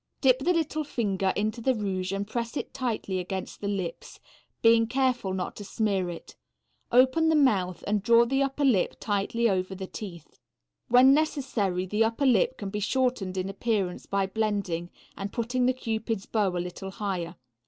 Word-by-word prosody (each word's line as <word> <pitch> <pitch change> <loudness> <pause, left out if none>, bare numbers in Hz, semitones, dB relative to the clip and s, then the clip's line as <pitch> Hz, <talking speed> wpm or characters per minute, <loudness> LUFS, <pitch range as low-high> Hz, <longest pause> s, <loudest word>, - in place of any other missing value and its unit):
Dip 255 -2 +4
the 320 +7 +1
little 315 -2 0
finger 195 -8 0
into 215 +3 -1
the 260 +2 +2
rouge 190 -3 -2
and 195 +1 -2
press 235 +4 -3
it - - -5
tightly 225 -7 -2
against 185 +1 -5
the 205 - -2
lips, 195 -4 -4 0.4
being 230 0 +5
careful 255 -5 0
not 185 -1 -3
to 205 - -7
smear 200 -3 -1
it; 170 - -9 0.6
open 260 +6 +4
the 320 - +3
mouth 195 - +2
and 210 0 0
draw 235 +2 +5
the 270 +3 0
upper 275 +1 0
lip 220 -9 +2
tight 205 0 -2
over 195 -5 +1
the 190 0 -5
teeth. 180 -5 -9 0.5
When 255 +3 +7
necessary 250 - 0
the 210 +4 +1
upper 230 +5 0
lip 470 - +3
can 200 -2 -5
be 210 - -2
shortened 215 -4 0
in 185 0 -1
appearance 195 -2 -2
by 200 -1 +1
blending 195 -4 -2 0.3
and 195 +1 -5
putting 245 +2 0
the - - +5
cupid's 225 -4 -3
bow 210 -3 +1
a 180 - -3
little 180 +2 -5
higher. 190 -4 -4
210 Hz, 175 wpm, -27 LUFS, 190-250 Hz, 0.6 s, When